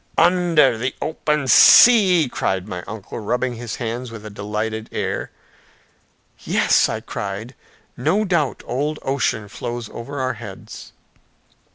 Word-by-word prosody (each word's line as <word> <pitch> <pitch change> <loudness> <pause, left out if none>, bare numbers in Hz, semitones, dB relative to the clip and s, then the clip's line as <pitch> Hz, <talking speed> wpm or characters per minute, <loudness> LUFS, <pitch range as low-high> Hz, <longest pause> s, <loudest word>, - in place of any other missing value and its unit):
"Under 165 -9 +3
the 125 +2 -2
open 150 -2 -2
sea," 185 - +7
cried 95 -5 -2
my 90 -4 -5
uncle, 105 0 -7
rubbing 125 +3 -2
his 115 -1 -6
hands 120 +1 -5
with 115 -2 -10
a 105 - -8
delighted 105 +2 -4
air. - - -3 1.1
"Yes," - - +2
I - - -4
cried, 100 +5 -6 0.4
"no 200 +12 0
doubt 170 -7 -1
old 145 +5 -2
Ocean 125 -6 -1
flows 120 +2 -6
over 140 +4 -7
our 130 0 -1
heads!" 110 -4 -11
120 Hz, 130 wpm, -20 LUFS, 110-150 Hz, 1.1 s, sea